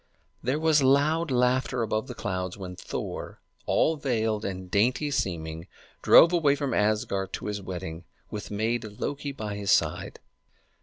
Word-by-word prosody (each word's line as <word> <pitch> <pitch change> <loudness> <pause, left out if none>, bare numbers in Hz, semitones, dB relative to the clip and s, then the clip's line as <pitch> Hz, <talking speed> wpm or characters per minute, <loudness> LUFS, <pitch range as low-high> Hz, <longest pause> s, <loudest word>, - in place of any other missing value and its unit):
There 130 +4 0
was 155 -1 +3
loud 145 +5 +3
laughter 125 0 +1
above 110 +2 -1
the 125 - -7
clouds 95 -4 -3
when 90 -2 -7
Thor, - - -6 0.3
all 160 0 +2
veiled 110 -6 -1
and 95 -2 -5
dainty 125 +8 +2
seeming, 80 - -3 0.3
drove 170 +2 +7
away 150 -5 +3
from 140 -4 -2
Asgard 105 -3 0
to - - -5
his 105 -1 -3
wedding, 90 -3 -6 0.3
with 105 - -6
maid 110 +3 -1
Loki 140 +7 -4
by 110 -6 -5
his 100 -1 -4
side. - - +1
110 Hz, 150 wpm, -27 LUFS, 95-140 Hz, 0.3 s, drove